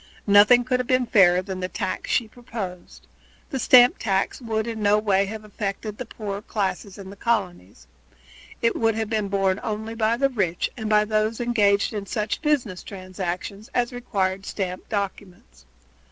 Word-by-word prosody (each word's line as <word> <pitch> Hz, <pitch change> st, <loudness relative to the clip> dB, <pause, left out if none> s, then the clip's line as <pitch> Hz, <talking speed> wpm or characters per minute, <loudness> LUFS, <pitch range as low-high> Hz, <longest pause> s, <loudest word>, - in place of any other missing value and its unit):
Nothing 210 Hz, +4 st, +6 dB
could 250 Hz, 0 st, 0 dB
have 250 Hz, -, -2 dB
been 255 Hz, -1 st, +2 dB
fairer 185 Hz, -5 st, +5 dB
than 190 Hz, -1 st, -5 dB
the 185 Hz, -, -2 dB
tax 185 Hz, -, -4 dB
that -, -, +1 dB
she 235 Hz, -, +1 dB
proposed. 215 Hz, -6 st, -8 dB, 0.5 s
The 270 Hz, -, -2 dB
stamp 245 Hz, 0 st, +6 dB
tax 195 Hz, +3 st, -1 dB
would 220 Hz, -2 st, -2 dB
in 225 Hz, -2 st, -5 dB
no 205 Hz, 0 st, +4 dB
way 200 Hz, -2 st, +2 dB
have 215 Hz, +1 st, -7 dB
affected 205 Hz, 0 st, -4 dB
the 255 Hz, -, -5 dB
poorer 205 Hz, -3 st, -5 dB
classes 200 Hz, -2 st, -3 dB
in 195 Hz, -1 st, -9 dB
the -, -, -10 dB
colonies. 190 Hz, -, -2 dB, 0.8 s
It 230 Hz, -, +3 dB
would 225 Hz, -1 st, +1 dB
have 220 Hz, 0 st, -3 dB
been 215 Hz, -2 st, 0 dB
borne 195 Hz, -1 st, +1 dB
only 220 Hz, 0 st, -4 dB
by 225 Hz, 0 st, +1 dB
the 275 Hz, +2 st, +2 dB
rich 190 Hz, -9 st, -1 dB
and 220 Hz, -3 st, -4 dB
by 210 Hz, 0 st, +4 dB
those 215 Hz, +1 st, 0 dB
engaged 210 Hz, -4 st, +2 dB
in 205 Hz, -2 st, -4 dB
such 210 Hz, +3 st, -2 dB
business 265 Hz, -, 0 dB
transactions 185 Hz, +1 st, -6 dB
as 245 Hz, 0 st, +1 dB
required 195 Hz, -5 st, -2 dB
stamped 185 Hz, -2 st, -4 dB
documents. 185 Hz, -, -6 dB
210 Hz, 175 wpm, -24 LUFS, 195-230 Hz, 0.8 s, Nothing